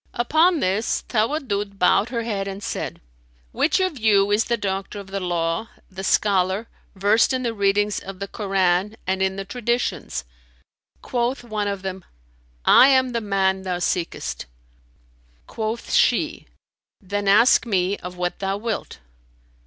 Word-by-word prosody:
Upon 315 +7 +3
this 195 +4 0
Tawaddud 215 -4 -1
bowed 195 +4 +3
her 235 -2 -2
head 200 -4 -2
and 195 +1 -6
said, - - -4 0.5
"Which 320 - +1
of 370 -7 -1
you 205 -2 +3
is 210 +2 +3
the 235 - 0
doctor 195 0 -3
of 195 -1 -11
the 195 - -2
law, 175 +2 -1 0.2
the 190 +1 -7
scholar, 195 +1 +1 0.3
versed 205 +6 +3
in 255 0 -1
the 235 -2 -1
readings 205 0 +1
of 195 0 -9
the 200 +1 -5
Koran 195 -1 0
and 190 +1 -1
in 190 0 +1
the 195 0 -5
Traditions?" 240 - -2 0.8
Quoth 245 +1 -1
one 215 -3 -3
of 200 -1 -3
them, 190 -1 -5 0.6
"I 260 - +8
am 260 -2 +4
the 235 -1 -2
man 195 -2 +1
thou 185 -2 -2
seekest." 175 - -3 1.0
Quoth 220 +1 -4
she, - - +2 0.5
"Then 205 0 -3
ask 230 +5 +5
me 190 -2 +1
of 180 0 -9
what 180 0 -2
thou 195 0 -1
wilt." 220 +1 -4
200 Hz, 150 wpm, -22 LUFS, 190-230 Hz, 1.0 s, I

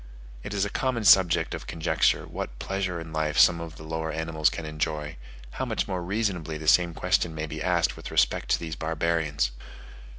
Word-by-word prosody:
It 100 - -6
is 100 0 +1
a 100 - -5
common 130 -4 -1
subject 85 -5 +5
of - - -6
conjecture 80 - +1
what - - -6
pleasure 95 0 -3
in 80 -1 -8
life 80 -1 -1
some 85 -1 +6
of 80 -2 -7
the 80 - -11
lower 80 0 -3
animals 80 -1 +1
can 80 - -6
enjoy: 75 -1 -3 0.5
how - - +1
much - - -2
more 95 -2 -2
reasonably 90 -5 -2
the 80 0 -8
same 85 0 +4
question 90 -3 +1
may 75 0 -3
be 80 0 -6
asked 90 -2 +1
with - - -8
respect - - +1
to - - +3
these 80 -2 -5
barbarians! 80 -4 0
80 Hz, 195 wpm, -26 LUFS, 80-90 Hz, 0.5 s, some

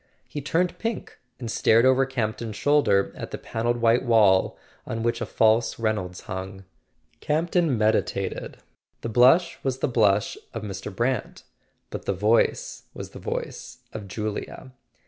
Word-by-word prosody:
He 145 - -5
turned 170 +5 0
pink 225 -1 -4 0.2
and 115 -3 -4
stared 115 +1 +4
over 130 0 +4
Campton's 110 -4 -3
shoulder 110 -5 +2
at - - -6
the - - -5
pan¬ 115 0 -5
elled 120 0 +2
white 115 +1 +3
wall, 105 -6 +4 0.3
on 115 0 -3
which 120 0 0
a 115 - -2
false 110 +2 +2
Reynolds 105 -5 -2
hung. 95 +1 -7 0.5
Campton 165 -2 +1
meditated. 110 0 -1 0.4
The 115 - -4
blush 130 +10 +4
was 130 -1 -1
the - - 0
blush 105 -4 +2 0.2
of 115 - -4
Mr. 100 0 -6
Brant, 120 +6 -2 0.5
but - - -6
the - - 0
voice 105 +5 +1
was - - -7
the - - -10
voice - - -5 0.2
of 105 -2 -7
Julia. 105 +6 -5
115 Hz, 150 wpm, -25 LUFS, 105-130 Hz, 0.5 s, stared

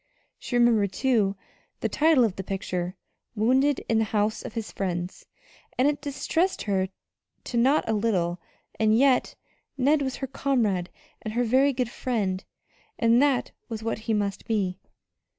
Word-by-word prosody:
She 245 - -2
remembered, 225 -5 +3
too, 215 -5 +2 0.5
the - - +1
title 310 -4 +4
of 215 -5 +1
the 190 - -5
picture: 185 -1 -3 0.4
"Wounded 260 +6 +2
in 225 -1 +2
the - - +3
house 210 0 0
of - - -8
his 225 -2 -4
friends," 180 -2 -4 0.5
and 255 - +4
it 290 0 0
distressed 295 +6 -1
her 190 -2 0 0.6
not 260 +6 +3
a 225 - +1
little; 185 -6 0 0.4
and 220 0 +4
yet 265 0 +3 0.4
Ned 285 +3 +3
was 265 -2 -2
her 270 - -4
comrade 235 -9 0 0.3
and 215 0 -5
her 245 - +2
very 260 +4 +4
good 250 -3 -2
friend, 200 -7 -2 0.5
and 230 +1 +4
that 280 -3 +2 0.2
was 225 -1 -5
what 225 -1 -2
he - - +3
must 200 -1 -2
be. 195 -5 -1
225 Hz, 155 wpm, -26 LUFS, 200-265 Hz, 0.6 s, title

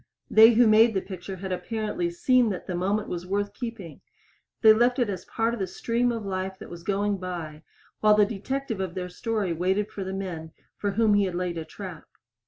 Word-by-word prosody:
They 225 +2 +8
who 240 +2 +5
made 220 0 +5
the 190 - +1
picture 190 0 -7
had 190 +1 -6
apparently 210 -2 -2
seen 245 +7 +3
that 190 - -4
the 185 - -4
moment 200 +4 -1
was 180 0 -5
worth 200 +1 -1
keeping 230 - -7 0.6
they 220 -1 +9
left 240 +3 +3
it 240 -5 +1
as 185 -2 -5
a - - -28
part 225 +1 0
of 235 - -4
the 190 - -1
stream 240 +6 0
of 225 -3 -4
life 190 0 -3
that - - -11
was 170 -1 -8
going 200 +2 0
by 170 -4 -6 0.4
while 210 0 +5
the 210 -1 +5
detective 225 +2 -4
of 185 -3 -3
their 180 -1 -4
story 210 -2 -2
waited 190 +5 0
for 195 - -5
the 190 - -5
men 170 -5 -5 0.2
for 205 -1 -2
whom 220 0 +3
he 205 -1 +4
had 185 -2 -3
laid 175 -2 -2
a 160 - -6
trap. 185 -5 -9
200 Hz, 220 wpm, -26 LUFS, 180-220 Hz, 0.6 s, they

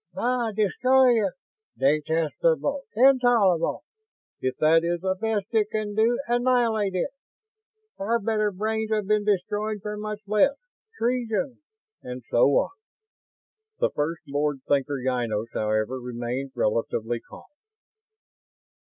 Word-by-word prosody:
"Bah 245 -2 0
destroy 240 +3 +3
it!" 195 - -1 0.4
"Detestable!" 160 - +1
"Intolerable!" 240 -8 +4 0.6
"If 130 0 -2
that 165 +1 +4
is 170 0 -1
the 190 0 +1
best 210 +1 -1
it 215 -2 +2
can 215 -1 -3
do, 225 +3 +2
annihilate 240 -5 +1
it!" 185 - -1 0.9
"Far 230 +4 +1
better 215 -1 0
brains 220 +3 -2
have 215 -2 0
been 210 +1 +2
destroyed 210 +2 0
for 210 -1 -4
much 210 0 -5
less!" 215 +7 +3 0.4
"Treason!" 235 -1 -1 0.4
And 125 0 -7
so 120 - +5
on. 140 - +2 1.2
First 160 +3 -2
Lord 145 -1 -1
Thinker 140 0 +1
Ynos, 115 -3 -1
however, 110 +4 -1
remained 125 +2 -4
relatively 115 +1 -1
calm. - - -14
205 Hz, 115 wpm, -25 LUFS, 145-225 Hz, 1.2 s, so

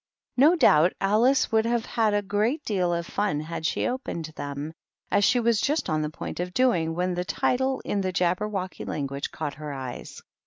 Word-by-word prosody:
No 295 +7 +6
doubt 165 - +5
Alice 225 +7 +3
would 220 0 +3
have 235 -1 0
had 220 -3 +1
a 205 - +1
great 215 +10 0
deal 185 -5 0
of 170 0 -1
fiin 160 -6 -1
had 160 0 -3
she - - -1
opened 170 - -4
them, 145 +2 -5 0.4
as 205 - +3
she 250 +4 +4
was 230 -2 +2
just 295 - 0
on 155 0 +1
the 150 - -2
point 155 - -7
of 180 +1 -4
doing, 175 -11 +2
when 180 +1 -1
a - - 0
title 260 +7 0
in 200 - -1
the 185 -1 -1
Jabber 180 +4 0
wocky 190 -3 -4
language 140 -1 -3
caught 145 - -4
her 150 -1 -5
eyes. 130 -2 -7
185 Hz, 200 wpm, -26 LUFS, 160-230 Hz, 0.4 s, No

